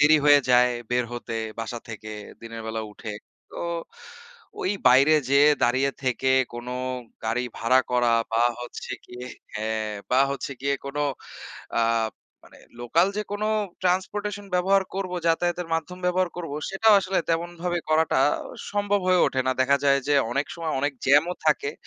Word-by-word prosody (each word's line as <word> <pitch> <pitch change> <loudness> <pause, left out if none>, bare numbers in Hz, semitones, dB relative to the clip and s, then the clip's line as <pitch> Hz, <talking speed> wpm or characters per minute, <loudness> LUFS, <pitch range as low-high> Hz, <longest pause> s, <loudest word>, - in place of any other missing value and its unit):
দেরি 155 +1 +7
হয়ে 145 -1 +8
যায় 125 0 +6 0.2
বের 125 0 +2
হতে 120 -1 -5 0.2
বাসা 115 +1 -4
থেকে 110 -1 -7 0.3
দিনের 115 0 -7
বেলা 110 0 -3
উঠে। 105 +1 -7 0.4
তো - - -11 1.0
ওই 185 - 0 0.2
বাইরে 135 +5 +6 0.2
যেয়ে 140 +2 +6
দাঁড়িয়ে 130 +3 +2
থেকে 130 +1 0 0.3
কোনো 120 +1 -6 0.5
গাড়ি 115 +3 0
ভাড়া 130 +3 +4
করা 120 -1 +3 0.2
বা 115 +1 +3 0.2
হচ্ছে 120 - -7 0.2
গিয়ে 125 +1 -9 0.3
হ্যাঁ, 110 0 -2 0.2
বা 130 +1 +4
হচ্ছে 140 0 -5
গিয়ে 140 +1 +1
কোনো 140 +1 -4 0.8
আ - - +3 0.6
মানে - - -17 0.2
লোকাল 165 +9 +3
যে 210 - 0
কোনো 205 +1 -1 0.3
ট্রান্সপোর্টেশন 205 +3 -1
ব্যবহার 190 +2 +3
করবো, 185 -2 -3
যাতায়াতের 175 +1 0
মাধ্যম 165 +3 -3
ব্যবহার 180 0 +1
করব 165 -4 -5 0.2
সেটাও 215 +3 +4
আসলে 190 0 0
তেমনভাবে 175 +1 -1
করাটা 155 -1 +3 0.5
সম্ভব 205 0 +1
হয়ে 185 -1 +4
ওঠে 130 - 0
না। - - +3
দেখা 140 +2 +3
যায় 140 0 +5
যে 145 - +3 0.2
অনেক 140 +2 0
সময় 165 -2 -3
অনেক 145 +1 0
জ্যাম 145 +3 +6
ও - - -2
থাকে। 150 -2 +2
145 Hz, 155 wpm, -25 LUFS, 125-180 Hz, 1.0 s, হয়ে